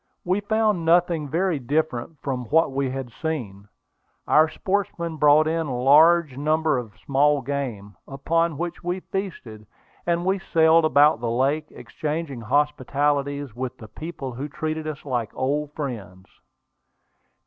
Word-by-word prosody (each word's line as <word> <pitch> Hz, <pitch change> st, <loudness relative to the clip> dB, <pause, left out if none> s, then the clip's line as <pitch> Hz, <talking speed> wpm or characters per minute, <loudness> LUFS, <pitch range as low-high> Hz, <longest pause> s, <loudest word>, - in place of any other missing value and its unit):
We 185 Hz, +3 st, +1 dB
found 215 Hz, -3 st, +1 dB
nothing 170 Hz, -2 st, +2 dB
very 170 Hz, 0 st, 0 dB
different 150 Hz, +1 st, -2 dB
from 130 Hz, -3 st, -3 dB
what 160 Hz, +5 st, +2 dB
we 135 Hz, 0 st, -1 dB
had 130 Hz, -2 st, -5 dB
seen. 115 Hz, -, -4 dB, 0.6 s
Our 155 Hz, +1 st, +5 dB
sportsmen 175 Hz, -4 st, -2 dB
brought 150 Hz, +1 st, +5 dB
in 165 Hz, 0 st, -1 dB
large 145 Hz, +5 st, +5 dB
quantities 155 Hz, +2 st, +1 dB
of 110 Hz, -4 st, -7 dB
small 145 Hz, +1 st, +3 dB
game, 120 Hz, -8 st, -4 dB
upon 160 Hz, +3 st, 0 dB
which 175 Hz, +2 st, -5 dB
we 175 Hz, +2 st, -2 dB
feasted, 130 Hz, -, -6 dB, 0.4 s
and 170 Hz, 0 st, 0 dB
we 190 Hz, +1 st, +1 dB
sailed 165 Hz, -2 st, +4 dB
about 150 Hz, -3 st, +4 dB
the 115 Hz, -1 st, -2 dB
lake, 140 Hz, +6 st, 0 dB
exchanging 150 Hz, +2 st, -5 dB
hospitalities 145 Hz, 0 st, 0 dB
with 130 Hz, 0 st, -5 dB
the 110 Hz, -, -11 dB
people 140 Hz, +2 st, -7 dB
who 135 Hz, +5 st, -5 dB
treated 155 Hz, +1 st, -4 dB
us 150 Hz, -2 st, -6 dB
like 120 Hz, -6 st, -2 dB
old 145 Hz, +3 st, -1 dB
friends. 105 Hz, -10 st, -6 dB
150 Hz, 135 wpm, -24 LUFS, 130-165 Hz, 0.6 s, Our